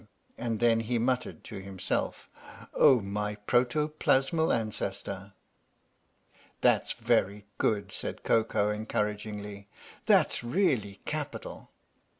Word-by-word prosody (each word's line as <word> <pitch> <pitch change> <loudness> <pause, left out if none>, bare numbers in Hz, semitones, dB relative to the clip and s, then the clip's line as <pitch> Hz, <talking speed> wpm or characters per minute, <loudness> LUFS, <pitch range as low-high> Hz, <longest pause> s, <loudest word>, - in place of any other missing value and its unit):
And 115 -2 -2
then 115 -1 +4
he 115 +2 -1
muttered 125 +2 -1
to 100 -4 -7
himself: 95 -1 -3 0.5
"Oh, 125 -4 +6
my 105 +1 -3
Protoplasmal 135 +6 +2
Ancestor! 100 -3 -3 0.6
" - - -33
"That's - - +3
very 105 -4 +1
good," 100 -3 +1
said - - -5
Koko, 105 -2 +2
encouragingly. 105 -1 -3 0.4
"That's - - +4
really 120 - 0
capital." - - -5
110 Hz, 100 wpm, -29 LUFS, 100-120 Hz, 0.6 s, Oh